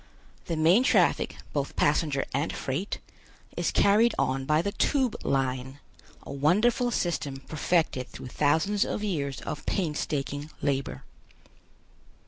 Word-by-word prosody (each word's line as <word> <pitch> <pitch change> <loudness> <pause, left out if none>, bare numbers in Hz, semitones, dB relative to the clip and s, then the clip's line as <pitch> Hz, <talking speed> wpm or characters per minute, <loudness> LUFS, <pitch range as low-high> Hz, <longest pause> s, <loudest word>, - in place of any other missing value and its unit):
The 170 - -2
main 165 +8 +5
traffic, - - +2 0.2
both 140 -1 -2
passenger 145 -2 +1
and 140 +5 0
freight, 145 +10 -3 0.6
is - - 0
carried 215 +4 +4
on 135 0 0
by 155 +3 +2
the 200 - -1
Tube 260 +1 +1
Line, 130 0 -1 0.5
a - - -7
wonderful 210 - +2
system 165 - -2
perfected 155 -4 0
through 125 - -9
thousands 160 +10 +2
of 210 - -3
years 145 -9 -2
of 155 - -5
painstaking 150 -4 -2
labor. 135 - -2
150 Hz, 120 wpm, -27 LUFS, 135-190 Hz, 0.6 s, main